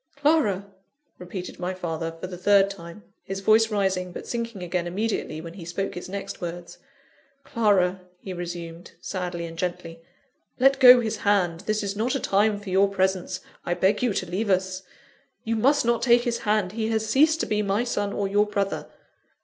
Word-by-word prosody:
"Clara!" 280 - +2 0.5
repeated 180 0 -7
my 180 +1 -3
father, 165 -2 -3
for - - -5
the 180 0 -7
third 195 +2 +4
time, 170 +1 -10 0.2
his 195 0 -5
voice 220 +3 +4
rising, 190 -3 0
but - - -8
sinking 230 -5 -4
again 175 0 -2
immediately 195 -4 -2
when 165 0 -9
he 180 -2 -9
spoke 175 +4 -3
his 180 - -7
next 195 0 -6
words, 175 0 -7 0.6
"Clara," 190 -6 +2 0.2
he 190 - -7
resumed, 175 -1 -7
sadly 175 -2 -4
and 165 0 -9
gently, 170 -2 -4 0.6
"let 270 +2 +4
go 250 -1 +9
his 220 -1 -2
hand; 195 -5 +1
this 215 0 0
is 200 0 -3
not 235 +6 0
a - - 0
time 205 0 +2
for 205 -2 -8
your 195 +2 +4
presence, 185 -1 -1 0.2
I 175 - -1
beg 190 +3 +2
you 245 -2 +2
to - - -1
leave 190 +5 -2
us. 185 0 0 0.6
You 225 0 -1
must 270 +4 +3
not 235 -1 +2
take 240 0 +4
his 240 -2 -1
hand! 210 -3 0
He 220 +1 -2
has 220 -1 0
ceased 305 +7 +4
to - - 0
be 210 0 0
my 205 +2 0
son, 205 -4 -2
or 200 -1 -1
your 205 +2 +2
brother. 200 -1 -2
195 Hz, 190 wpm, -25 LUFS, 180-220 Hz, 0.6 s, go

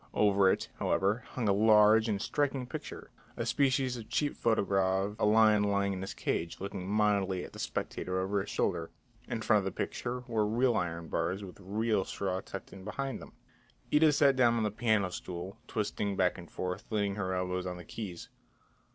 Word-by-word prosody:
Over 100 -2 +4
it, - - -1
however, 105 +5 +1
hung 120 -4 -1
a 100 - +4
large 110 +1 +5
and 100 -2 0
striking 135 +2 -1
picture, 125 - -8 0.3
a - - -2
species 130 -2 +1
of 110 -2 -9
cheap 145 -1 0
photogravure, 100 -3 +1
a - - +3
lion 110 -1 +5
lying 100 -1 +1
in 95 - -5
his 95 - -5
cage, 85 0 -2
looking 95 -1 -5
mildly 100 -3 +1
at - - -10
the - - -10
spectator 95 0 -3
over 95 +2 0
his - - -7
shoulder. - - -1 0.4
In - - -3
front - - +4
of - - -4
the - - -1
picture 125 +1 -3
were 115 -4 0
real 120 +2 +2
iron 85 -3 -2
bars, 85 +5 -1
with 95 0 -10
real 105 +2 0
straw 95 -1 -3
tucked 95 - -9
in 95 - -10
behind 135 +6 -4
them. - - -12 0.6
Ida 150 +1 +6
sat 140 -2 +4
down 120 -2 +4
on 115 - +1
the 105 - 0
piano 110 -4 +1
stool, 90 +4 -6
twisting 105 -2 -2
back 90 -2 +2
and 85 -2 -10
forth, 90 0 -4
leaning 105 -2 0
her 95 -2 -2
elbows 90 0 -2
on 90 -1 -4
the 90 - -10
keys. 95 -5 -7
100 Hz, 195 wpm, -31 LUFS, 95-115 Hz, 0.6 s, Ida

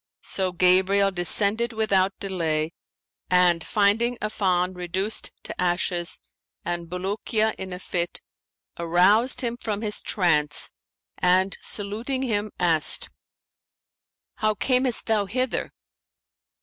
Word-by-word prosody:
So 190 -1 -1
Gabriel 190 +2 +3
descended 205 +6 +3
without 195 -3 +1
delay 165 -4 -2 0.6
and, 180 -2 +3
finding 220 +4 +1
Affan 185 -4 -1
reduced 185 +4 -1
to - - -5
ashes 175 -1 0 0.5
and 170 0 -3
Bulukiya 210 +4 -1
in 190 0 -6
a 180 - -5
fit, 175 -1 -3 0.6
aroused 185 +9 +3
him 240 -1 -2
from 215 -3 -4
his 210 -2 0
trance 150 -7 0 0.5
and 185 +2 +3
saluting 225 +6 -3
him 215 -4 -1
asked, 165 -4 +2 1.3
'How 215 0 +1
camest 255 +1 +1
thou 215 -3 +1
hither?' 255 +5 -2
195 Hz, 105 wpm, -24 LUFS, 180-215 Hz, 1.3 s, Gabriel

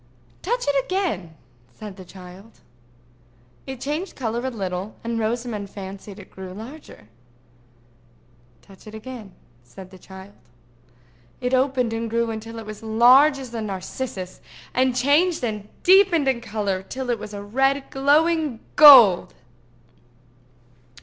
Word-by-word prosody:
"Touch 485 +6 -2
it 280 -2 +2
again," 310 - -3 0.4
said 210 -3 -9
the 185 - -11
child. 185 +4 -14 1.1
It 265 -2 -7
changed 300 +8 -4
color 235 -1 -3
a 260 - -1
little, 195 -3 -5
and 230 0 -3
Rosamond 220 -2 -3
fancied 195 0 -9
it 200 - -13
grew 185 -1 -9
larger. 225 - -12 1.6
"Touch 195 +2 -18
it 215 - -10
again," 220 -2 -9 0.3
said 185 +10 -13
the 185 - -14
child. 190 +2 -13 1.1
It 250 +1 -2
opened 255 -3 +1
and 230 0 -3
grew 230 0 -1
until 225 +1 -7
it 225 - -8
was 215 0 -8
as 220 - -17
large 250 +7 +5
as 260 -3 -9
a 230 - -4
narcissus, 190 -1 -6 0.3
and 255 0 +1
changed 290 +6 +2
and 210 -3 -4
deepened 370 -6 +5
in 255 -3 +1
color 205 -4 -3
till 250 +6 -5
it 235 - -2
was 210 0 -8
a 200 - -7
red 270 +6 0
glowing 295 -1 +2 0.2
gold. 255 -12 +8
230 Hz, 135 wpm, -22 LUFS, 200-270 Hz, 1.6 s, gold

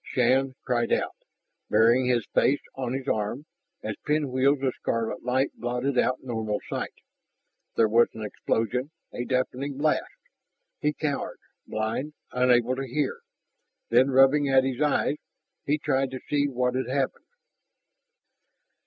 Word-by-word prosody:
Shann 130 +2 +2
cried 120 -2 0
out, - - +1 0.6
burying 115 +4 +4
his 120 -4 +2
face 145 - +3
on 130 -2 -3
his 135 0 -4
arm, 110 +6 -1 0.4
as 110 -1 -3
pinwheels 140 -2 +2
of 130 -2 +1
scarlet 115 -1 -2
light 130 +3 +1
blotted 125 +3 -2
out 130 +1 +1
normal 110 -4 -2
sight. - - -4 0.8
There 115 - +4
was 115 +2 +5
an 110 - -6
explosion, 115 +5 -1 0.2
a 120 - -3
deafening 130 +2 -1
blast. 155 +2 +1 0.7
He 150 - +1
cowered, 150 -2 -3 0.3
blind, 110 +7 -2 0.2
unable 125 0 +3
to 135 0 -3
hear. 135 +2 -1 0.7
Then, 125 +3 +5
rubbing 135 +2 +5
at 135 -1 +5
his 135 +1 -2
eyes, 150 0 +2 0.5
he 145 +2 +3
tried 135 -3 0
to 130 0 -6
see 145 -1 +2
what 125 -2 0
had 130 -1 -2
happened. 135 0 -1
130 Hz, 135 wpm, -26 LUFS, 120-140 Hz, 0.8 s, was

